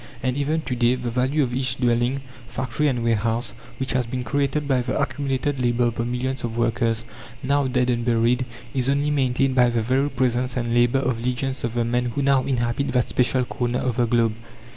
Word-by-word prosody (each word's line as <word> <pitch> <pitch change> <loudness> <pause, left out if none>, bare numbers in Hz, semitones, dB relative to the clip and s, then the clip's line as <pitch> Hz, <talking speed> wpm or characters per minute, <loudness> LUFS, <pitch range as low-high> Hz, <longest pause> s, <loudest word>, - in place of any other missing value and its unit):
And 130 -1 0
even 150 +3 0
to 125 - -3
day, 120 +1 +3
the 125 -2 -4
value 130 +5 +1
of 125 -2 -2
each 130 0 +2
dwelling, 120 +2 +1 0.3
factory, 130 +3 -1
and 125 -4 0
warehouse, 115 0 0 0.3
which 130 -1 -1
has 125 -2 0
been 125 +1 -3
created 140 +4 -1
by 130 -3 +2
the 125 - -2
accumulated 140 0 -1
labour 120 -1 +1
of 120 -1 +1
the 115 - -1
millions 125 +2 -2
of 115 -1 -3
workers, 115 -1 0 0.4
now 140 +1 +2
dead 125 -1 +1
and 120 -1 -1
buried, 120 +2 +2 0.3
is 130 -1 0
only 140 +2 +1
maintained 135 -1 +1
by 125 -1 +4
the 115 -2 0
very 130 +5 +1
presence 125 -1 0
and 120 -1 -1
labour 120 +2 +3
of 125 -3 -1
legions 130 +2 -2
of 120 0 -2
the 120 -1 +1
men 120 +1 0
who 120 +4 -2
now 135 -1 +3
inhabit 120 +1 0
that 125 -2 +1
special 125 0 +2
corner 120 0 -2
of 125 -2 -2
the 120 -1 +2
globe. 115 -1 +2
125 Hz, 210 wpm, -23 LUFS, 120-135 Hz, 0.4 s, by